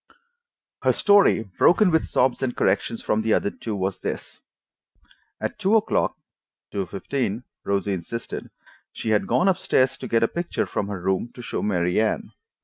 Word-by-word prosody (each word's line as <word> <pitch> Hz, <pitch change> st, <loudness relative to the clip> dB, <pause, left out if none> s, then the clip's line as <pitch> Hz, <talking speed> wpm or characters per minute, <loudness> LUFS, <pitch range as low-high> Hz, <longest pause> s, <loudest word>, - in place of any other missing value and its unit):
Her -, -, +3 dB
story, 200 Hz, -, +4 dB
broken 175 Hz, -, +3 dB
with 160 Hz, -, +2 dB
sobs 130 Hz, 0 st, +1 dB
and 130 Hz, -2 st, -2 dB
corrections 115 Hz, -, 0 dB
from 105 Hz, -, +1 dB
the 110 Hz, 0 st, +2 dB
other 100 Hz, -, 0 dB
two, 110 Hz, -2 st, -5 dB
was 95 Hz, 0 st, -2 dB
this: -, -, -6 dB, 1.0 s
At -, -, -4 dB
two 200 Hz, +4 st, +3 dB
o'clock 220 Hz, -, +1 dB, 0.5 s
(two 100 Hz, -2 st, -2 dB
fifteen, 115 Hz, +4 st, -3 dB, 0.2 s
Rosie 100 Hz, 0 st, 0 dB
insisted) 95 Hz, +6 st, -5 dB, 0.4 s
she 110 Hz, -, -3 dB
had 105 Hz, -, +2 dB
gone 180 Hz, -, +2 dB
up 190 Hz, -1 st, +3 dB
stairs 130 Hz, -7 st, +2 dB
to -, -, -5 dB
get 115 Hz, 0 st, +2 dB
a -, -, +4 dB
picture 170 Hz, +6 st, -2 dB
from 100 Hz, -, -3 dB
her 100 Hz, -2 st, -4 dB
room 95 Hz, +5 st, -1 dB
to 125 Hz, -, -9 dB
show -, -, -3 dB
Mary 90 Hz, -1 st, +1 dB
Anne. 110 Hz, -, -1 dB
110 Hz, 170 wpm, -24 LUFS, 100-135 Hz, 1.0 s, story